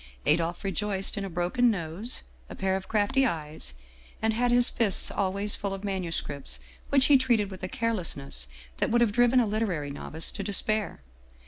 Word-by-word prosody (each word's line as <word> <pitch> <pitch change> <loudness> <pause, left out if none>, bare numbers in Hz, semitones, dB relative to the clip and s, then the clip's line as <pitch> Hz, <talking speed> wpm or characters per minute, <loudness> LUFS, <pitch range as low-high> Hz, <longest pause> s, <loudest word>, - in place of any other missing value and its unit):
Adolphe 170 +4 +1
rejoiced 195 0 -1
in 200 - -3
a 195 - -4
broken 180 +8 +1
nose, 195 +4 -1 0.3
a - - -8
pair 190 -1 0
of 190 0 -5
crafty 220 +5 +2
eyes, 150 - -3 0.4
and 220 0 +1
had 245 +2 +1
his 245 0 +7
fists 220 -6 +2
always 200 +1 0
full 200 -1 -3
of 195 - -10
manuscripts 170 -8 -3 0.3
which 275 -1 +5
he 280 -2 +6
treated 230 -6 +1
with 190 - -9
a 185 - -3
carelessness 180 - -2 0.3
that - - 0
would 240 +1 +3
have 235 -3 +3
driven 245 +3 +4
a 240 - +3
literary 200 -9 -2
novice 160 +3 -1
to - - -6
despair. 205 - -1
200 Hz, 180 wpm, -27 LUFS, 175-230 Hz, 0.4 s, his